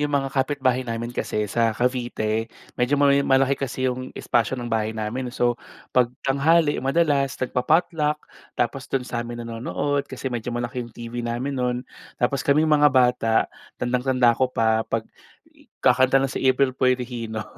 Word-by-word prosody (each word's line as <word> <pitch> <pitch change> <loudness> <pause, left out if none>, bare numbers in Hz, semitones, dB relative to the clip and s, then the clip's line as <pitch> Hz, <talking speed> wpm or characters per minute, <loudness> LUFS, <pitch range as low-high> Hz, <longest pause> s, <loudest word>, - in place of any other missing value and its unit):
'yong 150 - +1
mga 135 -1 0
kapitbahay 130 -2 0
namin 115 +1 -3
kasi 105 -3 -2
sa 115 +3 +1
Cavite 120 -3 -1 0.3
medyo 125 +4 +2
may 140 0 +4
malaki 135 0 +3
kasi 130 -1 -3
'yong 130 0 -4
espasyo 120 +2 0
ng 120 - -5
bahay 110 0 0
namin. 120 +4 -3
So, 120 -1 0 0.3
'pag 125 -2 +4 0.2
tanghali, 145 +3 +3
madalas 140 -1 +1
nagpa-potluck 150 +4 +1 0.4
tapos 125 +2 -2
do'n 130 -2 -1
sa'min 120 -1 -5
nanonood. 140 +5 -2
Kasi 130 - -4
medyo 120 0 -4
malaki 120 +1 -3
'yong 120 -1 -8
TV 120 +1 -5
namin 120 +4 -3
no'n. 125 -1 0 0.4
Tapos, 130 +3 0
kaming 155 +3 +3
mga 150 0 +6
bata, 125 -4 +2 0.4
tandang-tanda 125 -1 +2
ko 130 +2 +1
pa 110 -2 +2
'pag 115 -1 -2 0.5
i - - -24 0.2
kakanta 130 +1 +5
na 135 - +3
si - - -3
April 130 0 +3
Boy 130 0 +2
Regino 115 -3 -5
125 Hz, 160 wpm, -23 LUFS, 120-135 Hz, 0.5 s, mga